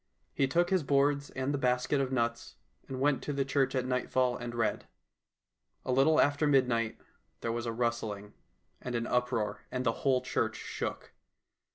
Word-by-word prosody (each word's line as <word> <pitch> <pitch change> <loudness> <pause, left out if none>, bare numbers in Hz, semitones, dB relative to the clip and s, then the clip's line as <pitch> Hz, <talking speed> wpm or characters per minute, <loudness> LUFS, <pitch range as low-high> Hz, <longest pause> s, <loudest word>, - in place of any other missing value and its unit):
He 135 - +2
took 175 +6 +1
his 190 -2 +3
boards 140 0 +2
and 130 +2 -2
the 140 - -1
basket 125 +2 +1
of 135 -1 -2
nuts, 120 -2 -1 0.3
and 130 -1 -5
went 140 0 +2
to 145 - -3
the 140 -1 0
church 135 0 +1
at 130 -1 0
nightfall 125 0 +1
and 120 0 -6
read. 115 -2 -1 1.0
A - - -1
little 135 +5 +4
after 145 +1 +3
midnight 125 -5 +2 0.4
there 115 - -1
was 120 +1 -3
a - - 0
rustling 110 -3 -2 0.5
and 125 -1 -4
an 115 0 -1
uproar, 125 -3 -1
and 130 0 -3
the 115 - +4
whole 130 -2 +3
church - - -1
shook. - - -5
130 Hz, 175 wpm, -31 LUFS, 120-140 Hz, 1.0 s, little